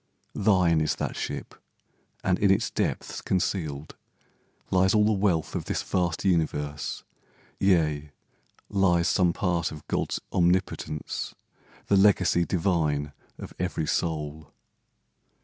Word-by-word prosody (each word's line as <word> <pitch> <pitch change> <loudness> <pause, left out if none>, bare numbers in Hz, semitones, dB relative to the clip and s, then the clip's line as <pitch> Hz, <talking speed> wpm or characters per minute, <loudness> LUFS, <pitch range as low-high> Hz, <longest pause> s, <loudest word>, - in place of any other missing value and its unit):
Thine 90 -6 +3
is 75 - +1
that - - -3
ship; - - -5 0.7
and 95 -1 +1
in 100 - +3
its 100 +4 +2
depths - - -2
concealed 80 -6 -2 0.8
Lies 95 +3 +3
all 105 -1 +5
the 110 - +3
wealth 95 -6 +1
of - - -3
this - - -2
vast 90 -1 -1
universe— 75 -5 -1 0.6
Yea, 75 -6 +2 0.6
lies 90 -4 +2
some 90 -2 +3
part 85 -2 0
of 75 - -10
God's - - -1
omnipotence, 85 -4 -1 0.5
The 100 - +3
legacy 95 -3 +4
divine 80 -6 0 0.3
of - - -9
every 80 - -1
soul. 75 -1 -2
85 Hz, 115 wpm, -27 LUFS, 75-95 Hz, 0.8 s, all